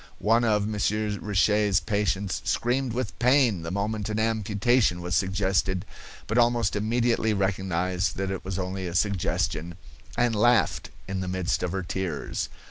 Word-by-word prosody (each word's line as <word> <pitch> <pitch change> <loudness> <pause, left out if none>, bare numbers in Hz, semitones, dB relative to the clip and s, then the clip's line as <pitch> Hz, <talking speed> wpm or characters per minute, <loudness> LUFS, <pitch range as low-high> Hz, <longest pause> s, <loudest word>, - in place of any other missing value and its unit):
One 115 +3 +2
of 105 -2 +2
Monsieur 105 0 0
Richet's 105 -1 +2
patients 100 -2 -1
screamed 125 0 0
with 125 +1 -4
pain 125 - +3
the 80 - -5
moment 105 +3 -2
an 110 - -2
amputation 110 -1 +1
was 90 +1 -2
suggested, 95 -1 0 0.4
but 110 +3 +1
almost 120 -4 +2
immediately 110 0 +1
recognized 95 -2 -1
that 95 0 -2
it 95 - -4
was 95 -1 -4
only 95 0 -3
a 85 - -6
suggestion, 85 -3 0 0.4
and 120 -1 +2
laughed 120 +3 +2 0.2
in 95 0 -3
the 95 - -3
midst 95 0 -1
of 90 - -2
her 95 0 -2
tears. 90 +1 -3
100 Hz, 150 wpm, -26 LUFS, 95-110 Hz, 0.4 s, pain